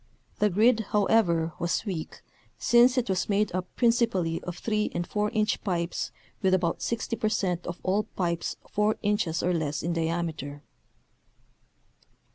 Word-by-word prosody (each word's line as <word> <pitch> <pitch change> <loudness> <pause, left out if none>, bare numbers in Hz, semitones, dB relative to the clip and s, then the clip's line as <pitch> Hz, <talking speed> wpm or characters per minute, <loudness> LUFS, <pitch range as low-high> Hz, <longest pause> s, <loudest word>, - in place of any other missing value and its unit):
The 210 - +4
grid, 220 +5 +4
however, 180 -6 +3
was 175 +5 -1
weak 180 -7 -5 0.3
since 245 +2 +5
it 250 - +1
was 185 -1 -1
made 205 +1 +2
up 185 0 -2
prin 235 -2 +4
cipally 190 -9 0
of 180 -1 -6
3 215 0 0
and 175 0 -1
4 210 +2 -1
inch 215 -1 0
pipes 175 -4 -1 0.3
with 190 -2 +4
about 175 -2 -1
60 230 0 -2
per 215 - +1
cent 180 -5 -1
of 175 0 -5
all 195 +3 +1
pipes 170 -2 -1 0.2
4 210 +1 +2
inches 205 -6 0
or 180 - +2
less 155 -3 -2
in 170 +1 0
diameter. 160 -4 -3
185 Hz, 155 wpm, -27 LUFS, 170-215 Hz, 0.3 s, since